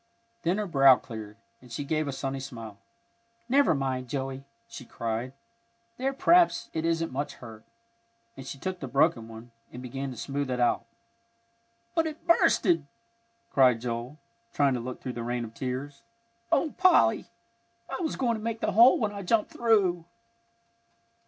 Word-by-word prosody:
Then 175 Hz, +4 st, 0 dB
her 210 Hz, -, -1 dB
brow 135 Hz, -7 st, +6 dB
cleared, 110 Hz, -4 st, -9 dB, 0.2 s
and 125 Hz, -1 st, -16 dB
she 130 Hz, +5 st, -4 dB
gave 155 Hz, +1 st, -1 dB
a -, -, -1 dB
sunny 135 Hz, 0 st, -4 dB
smile. 115 Hz, -6 st, -9 dB, 0.7 s
"Never 270 Hz, -, +4 dB
mind, 130 Hz, -2 st, -2 dB
Joey!" 135 Hz, 0 st, -4 dB, 0.2 s
she -, -, -9 dB
cried. 115 Hz, +1 st, -4 dB, 0.7 s
"There, 265 Hz, +2 st, 0 dB
p'r'aps 340 Hz, +5 st, +3 dB
it 160 Hz, 0 st, -2 dB
isn't 165 Hz, 0 st, 0 dB
much 140 Hz, +3 st, -3 dB
hurt," 110 Hz, -3 st, -12 dB, 0.7 s
and 135 Hz, -, -10 dB
she 140 Hz, -, -6 dB
took 185 Hz, +6 st, -4 dB
the 135 Hz, -, -5 dB
broken 135 Hz, -3 st, +2 dB
one, 115 Hz, +1 st, -11 dB, 0.2 s
and 125 Hz, -, -9 dB
began 135 Hz, +2 st, -5 dB
to 125 Hz, -, -8 dB
smooth 140 Hz, +1 st, -3 dB
it 125 Hz, -1 st, -2 dB
out. 120 Hz, -1 st, +1 dB, 1.1 s
"But 325 Hz, -1 st, +1 dB
it's 310 Hz, 0 st, -6 dB
bursted," 175 Hz, -, +3 dB, 0.6 s
cried 125 Hz, -4 st, +4 dB
Joel, 120 Hz, +4 st, -4 dB, 0.4 s
trying 140 Hz, -2 st, +3 dB
to 125 Hz, -, -1 dB
look 125 Hz, +2 st, -7 dB
through 125 Hz, -, -5 dB
the 120 Hz, -, -5 dB
rain 120 Hz, 0 st, -2 dB
of 110 Hz, -, -11 dB
tears. 135 Hz, +3 st, -5 dB, 0.5 s
"Oh, 315 Hz, -, +2 dB
Polly! 360 Hz, -, +4 dB, 0.6 s
I 270 Hz, -, -5 dB
was 320 Hz, -, -2 dB
going 240 Hz, -3 st, 0 dB
to -, -, -8 dB
make 230 Hz, 0 st, -3 dB
the -, -, 0 dB
hole 235 Hz, +5 st, +7 dB
when 215 Hz, -4 st, -1 dB
I 200 Hz, -1 st, -6 dB
jumped 210 Hz, +3 st, +1 dB
through." 195 Hz, -8 st, +2 dB
135 Hz, 165 wpm, -28 LUFS, 125-190 Hz, 1.1 s, hole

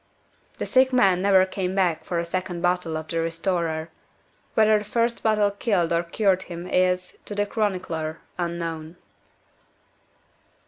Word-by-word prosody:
The -, -, -3 dB
sick 260 Hz, 0 st, +4 dB
man 195 Hz, -8 st, +4 dB
never 190 Hz, -1 st, +5 dB
came 185 Hz, 0 st, -3 dB
back 180 Hz, -5 st, +1 dB
for 175 Hz, -, -3 dB
a 170 Hz, -, -1 dB
second 175 Hz, 0 st, -3 dB
bottle 175 Hz, -2 st, 0 dB
of 160 Hz, 0 st, -6 dB
the 165 Hz, -, -1 dB
"Restorer." 165 Hz, -1 st, -1 dB, 0.7 s
Whether 215 Hz, -1 st, +5 dB
the -, -, -7 dB
first 230 Hz, +3 st, 0 dB
bottle 210 Hz, -2 st, +2 dB
killed 200 Hz, -5 st, 0 dB
or 170 Hz, -, +3 dB
cured 190 Hz, +2 st, +1 dB
him 175 Hz, -1 st, -7 dB
is, 180 Hz, 0 st, 0 dB
to 205 Hz, -, -6 dB
the 205 Hz, 0 st, +1 dB
chronicler, 180 Hz, -7 st, -2 dB, 0.2 s
unknown. 165 Hz, -2 st, -4 dB
180 Hz, 145 wpm, -24 LUFS, 170-200 Hz, 0.7 s, never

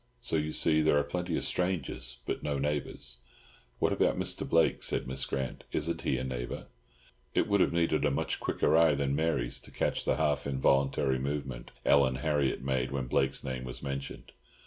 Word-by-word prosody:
So 120 Hz, -, -1 dB
you 75 Hz, 0 st, 0 dB
see, 80 Hz, 0 st, +3 dB
there 75 Hz, -1 st, +4 dB
are 75 Hz, -, +3 dB
plenty 90 Hz, +3 st, -2 dB
of -, -, -2 dB
strangers, 85 Hz, -9 st, -1 dB
but -, -, -2 dB
no 75 Hz, -1 st, -1 dB
neighbours." 70 Hz, -3 st, -3 dB, 0.6 s
"What -, -, +2 dB
about -, -, +2 dB
Mr. -, -, -1 dB
Blake?" 80 Hz, -1 st, +3 dB
said -, -, -1 dB
Miss 65 Hz, +1 st, -2 dB
Grant. 65 Hz, -2 st, -3 dB
"Isn't 85 Hz, +3 st, -1 dB
he 65 Hz, -, 0 dB
a 65 Hz, -, -3 dB
neighbour?" 60 Hz, -2 st, -4 dB, 0.7 s
It -, -, +3 dB
would 100 Hz, -1 st, +3 dB
have -, -, +3 dB
needed 80 Hz, -3 st, +1 dB
a 75 Hz, -, +4 dB
much 70 Hz, -, -1 dB
quicker 75 Hz, -, +1 dB
eye 80 Hz, -2 st, +5 dB
than 70 Hz, 0 st, 0 dB
Mary's 75 Hz, -6 st, 0 dB
to -, -, -14 dB
catch -, -, -1 dB
the -, -, +1 dB
half 75 Hz, -1 st, 0 dB
involuntary 70 Hz, 0 st, +2 dB
movement 70 Hz, -2 st, -4 dB, 0.2 s
Ellen 70 Hz, -2 st, +5 dB
Harriott 70 Hz, -2 st, 0 dB
made 65 Hz, -1 st, 0 dB
when 70 Hz, -2 st, -2 dB
Blake's 65 Hz, +2 st, +1 dB
name 65 Hz, -1 st, -4 dB
was 65 Hz, +2 st, -7 dB
mentioned. 70 Hz, -1 st, -5 dB
70 Hz, 190 wpm, -30 LUFS, 65-75 Hz, 0.7 s, eye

